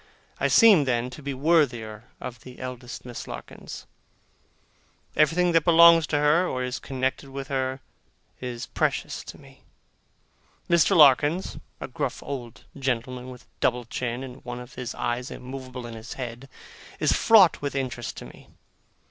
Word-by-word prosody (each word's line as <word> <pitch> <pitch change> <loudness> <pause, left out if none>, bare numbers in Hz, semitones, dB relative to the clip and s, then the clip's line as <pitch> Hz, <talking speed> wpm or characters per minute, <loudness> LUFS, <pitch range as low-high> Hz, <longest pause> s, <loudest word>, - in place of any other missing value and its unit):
I - - +2
seem, 205 - +6
then, 125 -1 0
to 150 - -10
be 140 -1 -4
worthier 125 -8 +1
of 120 -2 -7
the 125 -1 -12
eldest 125 -1 -7
Miss 120 -1 -7
Larkins. - - -9 1.3
Everything 170 +4 +3
that 165 -2 +3
belongs 170 -1 +7
to 150 - 0
her, 150 +5 +3
or 130 -5 -2
is 125 +1 -3
connected 130 +1 -3
with 135 0 -7
her, 130 -1 -2 0.6
is 125 -2 -5
precious - - -2
to - - -9
me. - - -18 1.1
Mr. 170 -3 +4
Larkins 150 +4 +4 0.2
(a - - -5
gruff - - -4
old 125 -5 -7
gentleman 125 -2 -3
with 125 -1 -11
a - - -32
double 125 -1 +1
chin, 120 +2 -4
and 130 0 -10
one 120 -1 -6
of 125 +1 -11
his 125 -2 -6
eyes 120 +1 -2
immovable 130 -1 -8
in 120 - -8
his 115 +1 -8
head) 125 +1 -7 0.5
is - - +2
fraught 205 -7 +5
with 140 -1 -3
interest 125 -3 -4
to - - -8
me. - - -15
130 Hz, 155 wpm, -25 LUFS, 125-145 Hz, 1.3 s, belongs